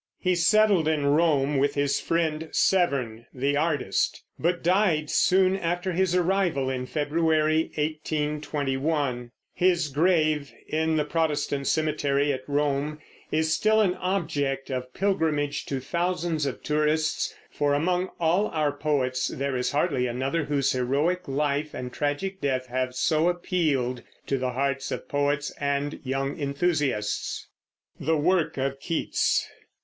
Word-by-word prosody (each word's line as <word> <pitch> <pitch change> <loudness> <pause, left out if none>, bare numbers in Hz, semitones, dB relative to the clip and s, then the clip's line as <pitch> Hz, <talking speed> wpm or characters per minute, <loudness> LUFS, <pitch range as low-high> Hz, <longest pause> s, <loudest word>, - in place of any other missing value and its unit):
He 185 -1 +1
settled 185 0 +4
in 155 -2 +1
Rome 145 -2 +3
with 140 +2 +1
his 140 -1 +1
friend 160 -1 -1
Severn, 130 -11 +1
the 140 +3 0
artist, 150 -1 0 0.2
but 175 +1 0
died 175 -4 +2
soon 190 0 +4
after 175 0 -1
his 180 0 +1
arrival, 175 -7 +1
in 125 -1 -3
February, 155 +1 +1
1821. 150 -3 -1 0.2
His 175 -4 +2
grave, 155 -1 +2 0.2
in 160 +1 0
the 150 - +1
Protestant 150 -3 -1
cemetery 145 -2 +1
at 130 - -4
Rome, 145 +1 0 0.3
is 160 0 +1
still 220 0 +3
an 195 -4 +3
object 145 -8 -1
of 125 -1 -4
pilgrimage 160 -6 0
to 135 - -2
thousands 170 +1 -1
of 135 - -5
tourists; 155 +1 0 0.2
for 145 -1 +1
among 180 +4 0
all 175 +5 +2
our 155 -2 0
poets 140 -3 0
there 140 0 -2
is 125 0 0
hardly 140 -4 +1
another 135 +6 -1
whose 140 -2 +1
heroic 145 +9 0
life 145 +2 -1
and 125 0 -6
tragic 150 +7 -2
death 130 -3 0
have 130 0 -2
so 155 +5 +2
appealed 155 -9 0 0.2
to 135 - -1
the 125 -1 -2
hearts 135 +1 -1
of - - -4
poets 145 0 0
and 140 +1 -1
young 135 +2 -2
enthusiasts. 140 -7 -1 0.5
THE 160 0 +1
WORK 170 +1 +1
OF 135 0 -2
KEATS. 165 +3 0
150 Hz, 135 wpm, -26 LUFS, 140-170 Hz, 0.5 s, settled